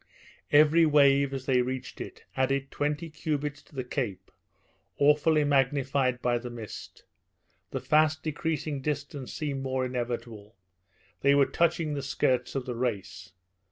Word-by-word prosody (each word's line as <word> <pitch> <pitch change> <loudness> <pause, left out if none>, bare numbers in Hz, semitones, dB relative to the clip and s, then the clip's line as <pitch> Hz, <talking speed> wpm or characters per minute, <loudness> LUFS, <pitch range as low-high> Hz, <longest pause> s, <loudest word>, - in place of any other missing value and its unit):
Each 150 +1 +6 0.2
wave, 140 -2 +4
as 135 -1 -5
they 130 -2 +3
neared 130 0 -4
it, - - -9
added 135 +1 0
twenty 150 +3 -2
cubits 150 -2 -3
to - - -21
the 130 - -2
cape, 105 -8 -4 0.7
awfully 150 +2 +4
magnified 135 -2 +1
by 120 -1 +2
the 125 +1 -7
mist; 115 -3 -9 0.7
the - - -3
fast 155 0 +2
decreasing 155 -2 -2
distance 145 -2 -4
seemed 140 -3 -3
more 130 -1 -1
inevitable 120 -4 -5 0.7
they 140 +1 +5
were 140 -1 +5
touching 165 -1 +1
the 140 - -2
skirts 130 -3 0
of 135 -2 -2
the 125 - -3
race! 100 -7 -4
135 Hz, 140 wpm, -28 LUFS, 125-150 Hz, 0.7 s, Each